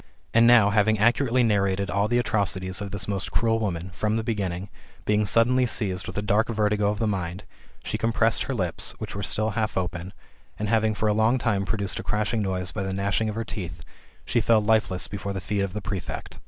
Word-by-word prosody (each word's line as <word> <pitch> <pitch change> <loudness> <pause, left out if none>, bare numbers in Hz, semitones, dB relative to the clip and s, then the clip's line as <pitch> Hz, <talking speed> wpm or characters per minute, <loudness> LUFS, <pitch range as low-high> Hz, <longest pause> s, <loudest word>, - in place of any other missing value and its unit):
And 115 0 +6
now, 115 -4 +6
having 110 +1 +3
accurately 120 +3 +3
narrated 100 -3 +1
all 100 +3 +1
the 120 +2 +1
atrocities 100 -5 0
of 100 - -4
this 100 -1 -4
most 100 -2 -1
cruel 115 -1 +1
woman, 90 -4 -3
from 105 +3 0
the 115 - -2
beginning, 100 -4 -2 0.4
being 105 0 +2
suddenly 125 +4 +3
seized 95 -6 -1
with - - -7
a 105 - -1
dark 105 +2 +2
vertigo 105 -2 +1
of 105 - -1
the 110 - 0
mind, 95 -2 -3 0.4
she - - -3
compressed 115 0 +2
her 135 - -3
lips, 90 -6 +1
which - - -6
were 100 - -4
still 110 +3 -1
half 110 +1 -2
open, 90 0 -3 0.5
and 105 -1 -3
having 110 -1 +2
for 110 - -1
a 105 - +3
long 110 +4 +3
time 105 -5 0
produced 100 -1 -2
a - - -5
crashing 105 +2 -1
noise 95 -2 -2
by 105 - -4
the 95 0 -3
gnashing 100 +3 0
of 105 - -4
her 115 - -2
teeth, 90 -6 -6 0.4
she 120 - +1
fell 115 0 +4
lifeless 105 -4 +1
at - - -13 0.2
the - - -2
feet 100 +2 -2
of 100 -2 -2
the 105 - -4
prefect. 95 -2 -5
105 Hz, 220 wpm, -25 LUFS, 95-110 Hz, 0.5 s, And